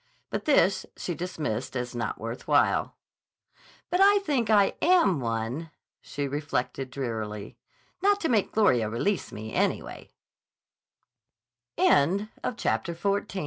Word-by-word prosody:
But -, -, -3 dB
this 190 Hz, -, +3 dB
she 175 Hz, -, -3 dB
dismissed 150 Hz, -9 st, -4 dB
as 125 Hz, -1 st, -3 dB
not 120 Hz, -, -3 dB
worth 115 Hz, +3 st, -6 dB
while. -, -, +2 dB, 1.0 s
"But 360 Hz, +2 st, +2 dB
I 405 Hz, +1 st, +7 dB
think 255 Hz, -8 st, 0 dB
I 205 Hz, -2 st, +4 dB
am 335 Hz, -, +4 dB
one," 115 Hz, +6 st, -3 dB, 0.3 s
she 145 Hz, -1 st, -4 dB
reflected 140 Hz, -2 st, -3 dB
drearily, 110 Hz, -6 st, -5 dB, 0.5 s
"not 405 Hz, +1 st, +3 dB
to 325 Hz, -, +1 dB
make 220 Hz, -8 st, +1 dB
Gloria 125 Hz, -, +3 dB
release 180 Hz, -, -1 dB
me, 110 Hz, +1 st, -7 dB
anywa -, -, -2 dB
145 Hz, 105 wpm, -27 LUFS, -, 1.0 s, I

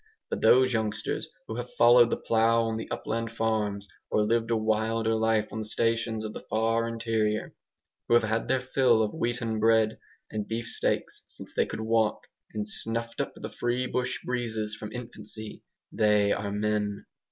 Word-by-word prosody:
But -, -, -2 dB
those 130 Hz, 0 st, +5 dB
youngsters 110 Hz, -2 st, -2 dB, 0.2 s
who 110 Hz, -, -5 dB
have 125 Hz, 0 st, -6 dB
followed 120 Hz, 0 st, +7 dB
the -, -, 0 dB
plough 115 Hz, 0 st, +3 dB
on 115 Hz, -1 st, -1 dB
the 110 Hz, -, -6 dB
upland 115 Hz, +1 st, -3 dB
farms, 105 Hz, -3 st, -1 dB, 0.2 s
or 105 Hz, -, +2 dB
lived 115 Hz, +1 st, +1 dB
a 115 Hz, -, +2 dB
wilder 110 Hz, +1 st, +1 dB
life 110 Hz, -1 st, +1 dB
on 110 Hz, -, -3 dB
the 110 Hz, -, -3 dB
stations 115 Hz, 0 st, 0 dB
of 105 Hz, -, -5 dB
the -, -, -6 dB
far 115 Hz, +1 st, +1 dB
interior, 115 Hz, -2 st, -1 dB, 0.5 s
who 120 Hz, -, +4 dB
have 120 Hz, -, +5 dB
had 110 Hz, +1 st, 0 dB
their 130 Hz, +1 st, +2 dB
fill 125 Hz, -3 st, +3 dB
of 105 Hz, -, -2 dB
wheaten 115 Hz, -2 st, -1 dB
bread 110 Hz, 0 st, +3 dB, 0.3 s
and 105 Hz, -1 st, -3 dB
beefsteaks 115 Hz, +1 st, -2 dB
since -, -, -11 dB
they -, -, +1 dB
could -, -, -5 dB
walk, 110 Hz, -1 st, +1 dB, 0.3 s
and 105 Hz, -1 st, -3 dB
snuffed 115 Hz, +2 st, -2 dB
up -, -, -4 dB
the -, -, -6 dB
free 120 Hz, +1 st, -1 dB
bush 125 Hz, 0 st, -1 dB
breezes 110 Hz, -4 st, -2 dB
from 105 Hz, 0 st, -7 dB
infancy, 110 Hz, -2 st, -8 dB, 0.3 s
they 105 Hz, -1 st, +3 dB
are 100 Hz, 0 st, -1 dB
MEN. 105 Hz, 0 st, -1 dB
110 Hz, 175 wpm, -28 LUFS, 110-115 Hz, 0.5 s, followed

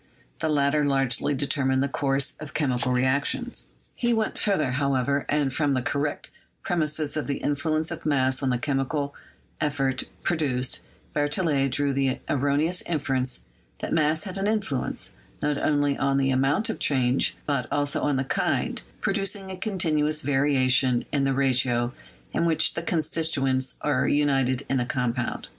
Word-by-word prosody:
The 160 Hz, -, 0 dB
latter 145 Hz, 0 st, +2 dB
largely 135 Hz, 0 st, +1 dB
determined 135 Hz, -1 st, +1 dB
the -, -, +1 dB
course 140 Hz, -1 st, 0 dB
of 155 Hz, -2 st, -9 dB
chemical 125 Hz, -4 st, 0 dB
reactions. 140 Hz, -, 0 dB, 0.3 s
He 240 Hz, -1 st, 0 dB
went 220 Hz, -1 st, -1 dB
further, 190 Hz, -11 st, +1 dB
however, 140 Hz, 0 st, 0 dB
and 145 Hz, -3 st, +1 dB
from 145 Hz, -1 st, +1 dB
the 130 Hz, -, -1 dB
correct 145 Hz, +3 st, -2 dB, 0.3 s
pre 175 Hz, -, -1 dB
mise 155 Hz, -2 st, 0 dB
of 155 Hz, -, -2 dB
the 140 Hz, -, -1 dB
influence 155 Hz, +3 st, -1 dB
of 170 Hz, -, -6 dB
mass 130 Hz, -3 st, +2 dB
on 135 Hz, -, +1 dB
the 125 Hz, -, +1 dB
chemical 140 Hz, +1 st, -1 dB, 0.5 s
effect 135 Hz, -3 st, 0 dB, 0.2 s
pro 175 Hz, -, +1 dB
duced, 130 Hz, -5 st, 0 dB, 0.3 s
Berthollet 145 Hz, -2 st, +1 dB
drew 140 Hz, +2 st, 0 dB
the 135 Hz, -1 st, +1 dB
erroneous 145 Hz, +6 st, +1 dB
inference 135 Hz, -5 st, -1 dB, 0.4 s
that -, -, -4 dB
mass 155 Hz, 0 st, +2 dB
had 195 Hz, -1 st, -4 dB
an 195 Hz, -, 0 dB
influence, 205 Hz, -, -2 dB, 0.3 s
not 145 Hz, -1 st, 0 dB
only 145 Hz, -2 st, +2 dB
on 135 Hz, 0 st, +2 dB
the 135 Hz, -1 st, +2 dB
amount 135 Hz, +11 st, +2 dB
of -, -, -7 dB
change 130 Hz, -2 st, +2 dB
but 140 Hz, -4 st, -1 dB
also 145 Hz, -1 st, 0 dB
on 145 Hz, -, +1 dB
the 135 Hz, -, +1 dB
kind, 135 Hz, -, 0 dB, 0.2 s
producing 195 Hz, -1 st, -2 dB
a -, -, -4 dB
continuous 155 Hz, -7 st, 0 dB
variation 130 Hz, -3 st, +3 dB
in 140 Hz, -2 st, +1 dB
the 135 Hz, -, +2 dB
ratio 125 Hz, -2 st, +2 dB, 0.4 s
in -, -, +1 dB
which 165 Hz, -2 st, +3 dB
the -, -, -3 dB
constituents 155 Hz, -5 st, 0 dB
are 150 Hz, -, +1 dB
united 135 Hz, -3 st, +2 dB
in 135 Hz, -, +1 dB
the 125 Hz, -, 0 dB
com 125 Hz, -2 st, 0 dB
pound. 120 Hz, -1 st, -3 dB
140 Hz, 160 wpm, -26 LUFS, 130-155 Hz, 0.5 s, variation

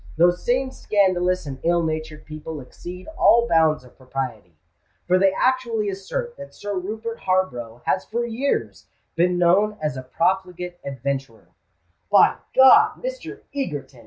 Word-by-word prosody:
Those 175 Hz, +1 st, +3 dB
same 260 Hz, +2 st, +1 dB
scandalous 185 Hz, -6 st, +1 dB
and 135 Hz, -2 st, -6 dB
ill 170 Hz, 0 st, +2 dB
natured 155 Hz, -1 st, -4 dB
people 155 Hz, 0 st, -7 dB
exceed 175 Hz, +7 st, -10 dB
all 235 Hz, -6 st, +5 dB
bounds 160 Hz, -, +3 dB
of 125 Hz, -, -18 dB
propriety; 125 Hz, -, -6 dB, 0.5 s
for 185 Hz, +1 st, +3 dB
they 195 Hz, 0 st, +4 dB
actually 235 Hz, -1 st, 0 dB
assert 475 Hz, -, -4 dB
that 280 Hz, -, -11 dB
Sir 205 Hz, 0 st, -5 dB
Rupert 220 Hz, +5 st, -4 dB
Harborough 125 Hz, -12 st, -1 dB
has 185 Hz, -, +1 dB
for 235 Hz, +2 st, -2 dB
years 240 Hz, +5 st, -2 dB, 0.3 s
been 175 Hz, +2 st, +2 dB
known 195 Hz, +5 st, +3 dB
as 150 Hz, -3 st, -2 dB
a -, -, -4 dB
profligate 180 Hz, +4 st, -2 dB
adventurer——" 135 Hz, -3 st, -5 dB, 0.6 s
"By -, -, +5 dB, 0.2 s
God, 420 Hz, -, +6 dB
Mr. -, -, -6 dB
Egerton!" 145 Hz, -, -4 dB
180 Hz, 140 wpm, -23 LUFS, 150-215 Hz, 0.6 s, God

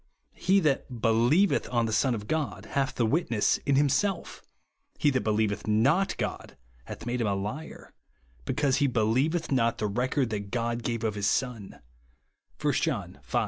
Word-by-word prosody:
He 195 Hz, +1 st, +2 dB
that 135 Hz, -5 st, -1 dB
believeth 120 Hz, -, +3 dB
on 120 Hz, -2 st, +2 dB
the 110 Hz, -, -2 dB
Son 125 Hz, +3 st, +2 dB
of 105 Hz, -1 st, -7 dB
God 155 Hz, +1 st, -2 dB
hath 135 Hz, -1 st, 0 dB
the 120 Hz, -, +1 dB
witness 115 Hz, -4 st, +1 dB
in 140 Hz, -, +3 dB
himself; 145 Hz, +8 st, 0 dB, 0.6 s
he 145 Hz, -, +3 dB
that 130 Hz, -, 0 dB
believeth 105 Hz, -1 st, 0 dB
not 135 Hz, -, +2 dB
God -, -, -5 dB, 0.3 s
hath -, -, -8 dB
made 120 Hz, 0 st, -2 dB
him 110 Hz, -, +1 dB
a 100 Hz, -, +1 dB
liar, 105 Hz, +11 st, -6 dB, 0.5 s
because 140 Hz, -, +1 dB
he 145 Hz, -, +3 dB
be 120 Hz, -4 st, 0 dB
lieveth 145 Hz, +11 st, +1 dB
not 115 Hz, -3 st, +2 dB
the 105 Hz, -, -2 dB
record 125 Hz, +4 st, 0 dB
that 100 Hz, -2 st, -4 dB
God 120 Hz, +1 st, -2 dB
gave 115 Hz, -1 st, -3 dB
of 110 Hz, -2 st, 0 dB
his 100 Hz, -1 st, -1 dB
Son," 120 Hz, -6 st, -2 dB, 0.8 s
(1 -, -, +1 dB
John -, -, -2 dB
v. -, -, 0 dB
120 Hz, 175 wpm, -28 LUFS, 110-140 Hz, 0.8 s, believeth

